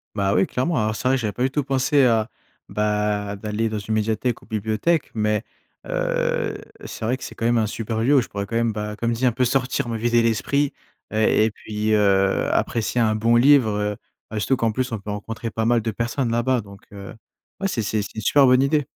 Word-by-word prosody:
Bah 100 -1 +1
oui, 95 - +4
clairement, 155 +7 -1
alors 110 -3 +1
c'est 125 - -2
vrai, 130 - +3
que 130 - -2
j'avais 105 -2 -1
pas 125 - -3
du 130 - +1
tout 145 +1 0
pensé 135 +1 +2
à 115 -2 +2 0.4
bah, 105 -1 -1
d'aller 110 +2 -2
dans 110 -1 -3
une 110 +2 -4
médiathèque 110 +2 -1
ou - - -17
bibliothèque. 110 +9 0
Mais, 105 0 0 0.4
heu, - - -1 0.3
c'est 110 - -6
vrai 125 - +1
que 130 - -10
c'est - - -7
quand 115 - -4
même 120 0 +3
un 110 - +2
super 110 +1 -3
lieu 140 +5 +4
où - - +5
je - - -6
pourrais 100 0 -4
quand 115 +3 -3
même, 115 -2 +1
bah, 105 0 -5
comme 115 0 0
dit, 120 +3 -1
un 125 - +4
peu 125 +2 0
sortir, 125 -1 0
me 115 -1 -2
vider 120 +1 +2
l'esprit 135 +5 +1 0.4
et 110 0 +3
et 110 - 0
puis, 105 +1 -3
heu, 100 -2 +2
apprécier 115 +1 0
un 110 -2 +2
bon 115 +2 +3
livre 135 -2 +5
heu, 105 0 -1 0.4
heu 110 - -1
surtout 130 +5 +1
qu'en 115 -2 0
plus, 130 0 -2
on 115 - -3
peut 105 +1 -6
rencontrer 115 +3 -5
pas 110 +1 -2
mal 120 +1 +3
de 110 - -2
personnes 120 +3 -2
là-bas. 120 +2 +1
Donc 100 -1 -11
heu, 100 -1 -9 0.5
ouais, 195 - +1
c'est 115 - -1
c'est 105 0 -1
c'est 105 - -7
une 110 - -4
super 140 +3 +4
bonne 130 +1 +5
idée. 145 0 +2
115 Hz, 240 wpm, -22 LUFS, 105-125 Hz, 0.5 s, où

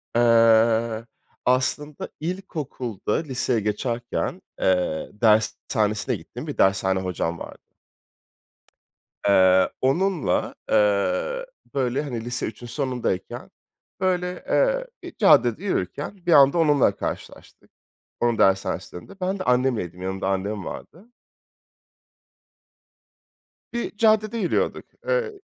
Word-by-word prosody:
Eee, 115 -1 +4 0.4
aslında 140 +4 0
ilkokulda 150 - -4
liseye 130 -5 -1
geçerken, 115 +3 -2 0.2
eee, 90 -4 +1
dershanesine 110 -1 +1
gittiğim - - -9
bir - - -5
dershane 95 0 +2
hocam 90 -2 -3
vardı - - -9 1.7
eee 95 -1 +5
onunla, 170 +5 +1 0.2
eee, 275 - +1 0.3
böyle 130 0 0
hani 120 -6 -5
lise 120 0 -3
3'ün 120 +2 -8
sonundayken 125 - -3 0.5
böyle, 180 -1 0 0.2
eee, - - +2 0.2
bir 355 -1 -9
caddede 150 - +4
yürürken 170 - -3
bir 175 - +3
anda 140 +2 +6
onunla 150 -4 +3
karşılaştık - - -7 0.5
onun 120 -1 +1
dershanesinin 95 -2 +1
önünde. 195 0 -15
Ben 190 +2 -1
de 185 - -4
annemleydim, 125 - 0
yanımda 95 0 -3
annem 100 +1 -2
vardı. 180 - -9 2.6
Bir 235 -3 -4
caddede 215 +1 +3
yürüyorduk. 185 -6 0 0.2
Eee - - +1
125 Hz, 100 wpm, -24 LUFS, -, 2.6 s, anda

